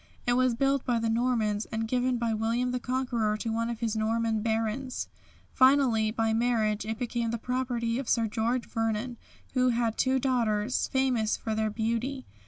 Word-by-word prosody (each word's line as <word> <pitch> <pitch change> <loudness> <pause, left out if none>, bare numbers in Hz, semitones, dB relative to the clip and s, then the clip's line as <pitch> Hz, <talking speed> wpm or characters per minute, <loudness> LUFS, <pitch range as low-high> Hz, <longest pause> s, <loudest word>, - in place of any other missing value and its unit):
It 245 - +2
was 255 -1 +2
built 275 +1 +1
by 245 -2 +1
the 225 0 0
Normans 225 -3 +1
and 225 0 -3
given 250 +1 +1
by 235 -1 0
William 230 +3 0
the 250 - -1
Conqueror 240 -4 -1
to 225 +1 -3
one 230 +1 -1
of 235 -1 -5
his 225 -2 -1
Norman 220 0 0
Barons. 225 +3 -2 0.5
Finally 260 -5 +4
by 225 0 0
marriage 220 -3 +1
it 220 0 -2
became 235 -1 -2
the 235 - -1
property 245 -1 -1
of 270 - -5
Sir 230 -1 +3
George 230 +3 -1
Vernon, 225 +2 -2 0.4
who 255 -1 +3
had 230 -2 0
two 260 0 +3
daughters, 240 -3 0
famous 255 -5 +1
for 220 - -3
their 215 0 0
beauty. 235 +5 -2
230 Hz, 180 wpm, -28 LUFS, 220-250 Hz, 0.5 s, Finally